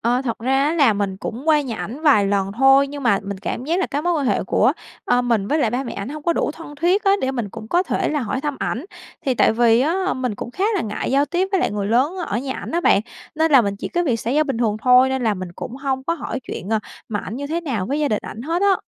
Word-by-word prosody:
ờ, 245 +3 +1
thật 235 -4 -3
ra 265 +3 +1
á, 300 - +1
là 285 -9 +4
mình 200 -2 -2
cũng 235 +9 -6
qua 305 -1 +5
nhà 250 -6 -4
ảnh 250 +8 -6
vài 265 -11 +5
lần 195 -1 0
thôi. 270 +4 +5
Nhưng 285 0 -7
mà 230 -6 +3
mình 200 -1 -5
cảm 225 +5 -4
giác 335 +6 0
là 375 - +1
cái 290 0 -3
mối 350 +1 +1
quan 295 -5 0
hệ - - +1
của, - - +3 0.3
a, 245 - +3
mình 230 -5 0
với 305 - +1
lại 240 -7 +2
ba 250 +3 -2
mẹ 240 - -5
ảnh 200 +3 -5
hông 300 +2 -7
có 340 - +2
đủ 325 - 0
thân 315 -2 -10
thiết 360 +5 +2
á, 390 - +5
để 260 - 0
mình 240 -6 -3
cũng 215 +3 -9
có 350 +7 +3
thể - - -1
là 300 - -1
hỏi 255 +2 -2
thăm 290 -1 -3
ảnh. 250 - -3 0.4
Thì 260 - +2
tại - - +4
vì 230 0 +4
á, 370 +7 0
mình 255 -4 -2
cũng 235 - -7
khá 375 +10 -2
là 390 - +1
ngại 210 -6 -3
giao 275 +2 +3
tiếp 355 +7 0
với 385 - +2
lại - - +1
người 205 -1 -2
lớn 255 - +2
ở 205 - -1
nhà 265 +1 -4
ảnh - - -7
á 340 - 0
bạn, 200 - +4 0.3
nên 320 0 +1
là 270 - +8
mình 200 -1 -2
chỉ - - -5
có 350 0 0
việc 240 -7 0
xã 230 - -3
giao 300 +4 +3
bình 270 -6 -3
thường 220 -3 +1
thôi, 250 +1 +6
nên 265 -1 -1
là 220 -3 +2
mình 185 -2 -7
cũng 245 +7 -7
hông 265 -1 -2
có 335 - 0
hỏi 270 -4 -5
chuyện, 190 - -7
à, 220 - +3 0.3
mà 205 -2 -2
ảnh 210 - -6
như 285 +2 -4
thế 325 +4 -2
nào 245 - -2
với 285 +4 -1
gia 295 - +1
đình 210 - 0
ảnh 225 - -8
hết 335 +6 -1
á. 395 -2 +3
265 Hz, 305 wpm, -21 LUFS, 225-305 Hz, 0.4 s, là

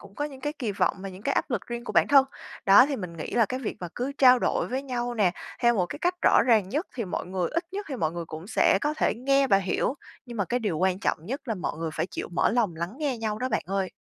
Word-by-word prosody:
cũng 200 -1 -15
có 290 - -2
những 275 -3 -7
cái 295 +2 -2
kỳ 245 -9 -3
vọng 200 - +1
và 195 - -5
những 190 +1 -11
cái 275 - 0
áp - - -1
lực 235 -6 -2
riêng 240 0 -5
của - - -5
bản - - +4
thân, 275 -2 +7 0.4
đó. 205 +7 +8
Thì 285 - -2
mình 180 -6 -7
nghĩ 155 - -6
là 230 -2 +4
cái 255 +5 -4
việc 230 - -4
mà 175 - -4
cứ 260 +3 -3
trao 255 -2 +7
đổi - - 0
với 260 +2 -3
nhau 245 -3 -3
nè, 205 -6 +3 0.3
theo 235 0 +4
một 180 -4 +1
cái 290 - -7
cách 355 +2 +1
rõ - - +5
ràng 215 -6 +4
nhất 300 - -2
thì 230 - -2
mọi 180 - -4
người 180 -1 -1
ít 335 +3 -1
nhất 405 +1 -4
thì 270 - -4
mọi 160 -7 -1
người 170 -1 -4
cũng 160 +2 -9
sẽ 210 -2 +3
có 300 +1 0
thể - - +1
nghe 275 +4 +2
và 195 - +5
hiểu. 195 +6 0 0.3
Nhưng 240 -1 -8
mà 200 - +1
cái 245 +5 -1
điều 195 -8 -1
quan 185 0 +1
trọng - - 0
nhất 270 +7 -3
là 225 - 0
mọi 180 - -4
người 165 -1 -3
phải - - -1
chịu - - -5
mở - - +2
lòng 220 -8 +1
lắng 170 +4 -4
nghe 275 -6 -1
nhau 215 -1 -2
đó 255 +2 -1
bạn 215 - 0
ơi. 195 -1 -1
230 Hz, 305 wpm, -26 LUFS, 190-265 Hz, 0.4 s, đó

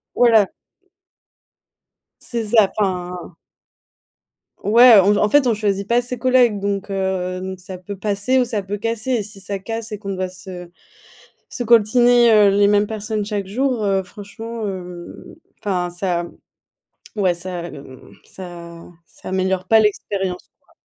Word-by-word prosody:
Voilà. 225 -5 +4 1.7
C'est 230 -3 -3
ça, 215 -4 +5
enfin 180 -3 -3 1.3
ouais, 230 0 +7
en 195 +2 +4
v - - 0
en 210 - +2
fait, 285 -1 +4
on 235 - +3
choisit 200 -2 -1
pas 240 +1 +2
ses 250 +1 -5
collègues, 245 -4 +3
donc, 200 0 -3
heu, 190 -1 -2
n 190 0 -6
ça 185 0 -9
peut 200 +3 -8
passer 205 +6 0
ou 250 - +2
ça 225 -4 -2
peut 200 +2 -5
casser, 230 +2 -2
si 205 -1 -9
ça 200 +1 -4
casse 225 +3 -6
et 210 - -4
qu'on 195 -1 -5
doit 185 0 -2
se 180 -1 -10 0.8
se 245 - -4
coltiner, 240 +1 +5
heu, 210 -2 +6
les 200 +1 +3
mêmes 205 0 +3
personnes 215 -1 -3
chaque 205 -2 -3
jour, 250 +3 -1
heu, 195 -1 +1
franchement, 220 +4 -8
hem, 180 -3 -7 0.5
enfin 180 -3 -1
ça, 175 -1 -2
mmh, - - -9 0.9
ouais 185 -3 +2
ça, 175 -1 -6
mmh, 135 -2 -13
ça 170 -2 -10 0.2
ça - - -13
améliore 190 0 -1
pas 225 -1 +5
l'expérience, 195 -3 -2
quoi. - - -29
200 Hz, 155 wpm, -20 LUFS, 185-225 Hz, 1.7 s, ouais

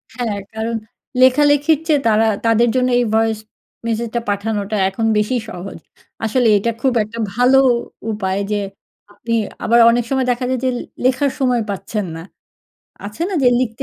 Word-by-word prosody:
হ্যাঁ, 230 -5 -2 0.2
কারণ 225 +1 -3 0.5
লেখালেখির 290 +3 +4
চেয়ে 295 -3 +3
তারা 220 0 +3 0.2
তাদের 230 +1 +3
জন্য 255 0 +2
এই 240 - +1
ভয়েস 225 -1 +1 0.5
মেসেজটা 230 +1 -2
পাঠানোটা 205 0 -2
এখন 225 +4 -3
বেশি 210 +5 0
সহজ। 185 -1 -8 0.5
আসলে 235 +2 +2
এটা 230 +4 0
খুব 265 -2 +2
একটা 230 +2 -9 0.2
ভালো 250 +2 +4 0.5
উপায় 195 -2 -2
যে, 205 -1 0 0.5
আপনি 230 +2 -5 0.3
আবার 235 +1 +4
অনেক 240 +1 +2
সময় 265 -1 0
দেখা 245 +1 -2
যায় 260 -2 0
যে, 255 - +3
লে - - -4 0.2
লেখার 265 +2 +2
সময় 250 -3 +1
পাচ্ছেন 200 +1 -3
নাl 165 +2 -9 0.8
আছে 210 +10 -6
না 390 - -4
যে, 250 - +6
লিখতে 225 -3 -3
230 Hz, 160 wpm, -18 LUFS, 215-255 Hz, 0.8 s, যে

